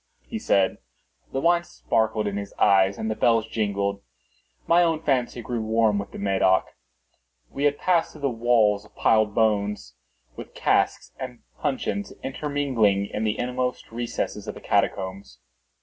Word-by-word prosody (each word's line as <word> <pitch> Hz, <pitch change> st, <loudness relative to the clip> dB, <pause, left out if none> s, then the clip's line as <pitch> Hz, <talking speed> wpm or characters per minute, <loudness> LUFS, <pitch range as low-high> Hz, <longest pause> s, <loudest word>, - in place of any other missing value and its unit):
he 225 Hz, -, -5 dB
said. 100 Hz, -, +2 dB, 0.5 s
The 135 Hz, -, -1 dB
wine 170 Hz, +3 st, +3 dB
sparkled 110 Hz, -9 st, -1 dB
in 100 Hz, -1 st, -2 dB
his 100 Hz, 0 st, -5 dB
eyes 95 Hz, 0 st, +4 dB
and 110 Hz, -, -3 dB
the 110 Hz, -, 0 dB
bells 115 Hz, -1 st, +3 dB
jingled. 100 Hz, -3 st, -2 dB, 0.6 s
My 170 Hz, +1 st, +5 dB
own 165 Hz, -2 st, +1 dB
fancy 125 Hz, -4 st, 0 dB
grew 120 Hz, 0 st, -3 dB
warm 110 Hz, -1 st, +2 dB
with 100 Hz, -, -5 dB
the -, -, -10 dB
Medoc. 95 Hz, -1 st, +2 dB, 0.8 s
We 140 Hz, -, -2 dB
had 145 Hz, 0 st, +2 dB
passed 175 Hz, -3 st, +1 dB
through 145 Hz, -2 st, -2 dB
walls 115 Hz, -4 st, +2 dB
of 105 Hz, -, -21 dB
piled 110 Hz, -2 st, +2 dB
bones, 105 Hz, -, 0 dB, 0.4 s
with -, -, -10 dB
casks -, -, +1 dB
and 125 Hz, -2 st, -7 dB, 0.2 s
puncheons 195 Hz, +9 st, -2 dB
intermingling, 130 Hz, -8 st, 0 dB
into 110 Hz, -, -1 dB
the 110 Hz, 0 st, 0 dB
inmost 125 Hz, 0 st, -3 dB
recesses 120 Hz, +1 st, -4 dB
of -, -, -5 dB
the -, -, -11 dB
catacombs. 95 Hz, -8 st, -1 dB
110 Hz, 150 wpm, -25 LUFS, 100-135 Hz, 0.8 s, My